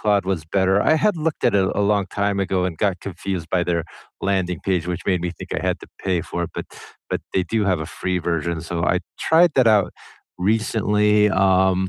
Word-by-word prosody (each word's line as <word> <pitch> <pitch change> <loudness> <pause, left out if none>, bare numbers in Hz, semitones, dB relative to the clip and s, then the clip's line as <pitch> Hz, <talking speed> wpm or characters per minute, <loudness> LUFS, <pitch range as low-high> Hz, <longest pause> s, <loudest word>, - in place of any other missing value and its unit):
Claude 105 -3 +2
was 90 -5 -1
better, 95 +2 +2
I 155 - +4
had 205 +2 +2
looked 155 -3 -2
at 120 - +3
it 95 -2 +3
a 105 - 0
long 100 -1 +2
time 100 -1 0
ago 95 -1 0
and 85 -3 -3
got 95 -4 0
confused 95 -3 -5
by 90 -1 +2
their 85 -2 -1 0.4
landing 95 -4 -1
page, 90 -3 0
which 90 0 -3
made 90 -3 +1
me 90 0 -3
think - - -7
I - - -2
had - - 0
to - - -11 0.2
pay 90 -3 0
for 85 0 -3
it, - - -8
but - - -5 0.4
but - - -1
they 95 - +3
do 110 -2 0
have 95 -5 +1
a 80 - -4
free 90 +3 -2
version, 85 -1 -2
so 85 0 -2
I 90 - +2 0.2
tried 170 +2 +5
that 130 -3 +5
out 105 -3 +4 0.5
recently, 105 0 +2
um, 95 -1 +3
95 Hz, 220 wpm, -22 LUFS, 90-105 Hz, 0.5 s, tried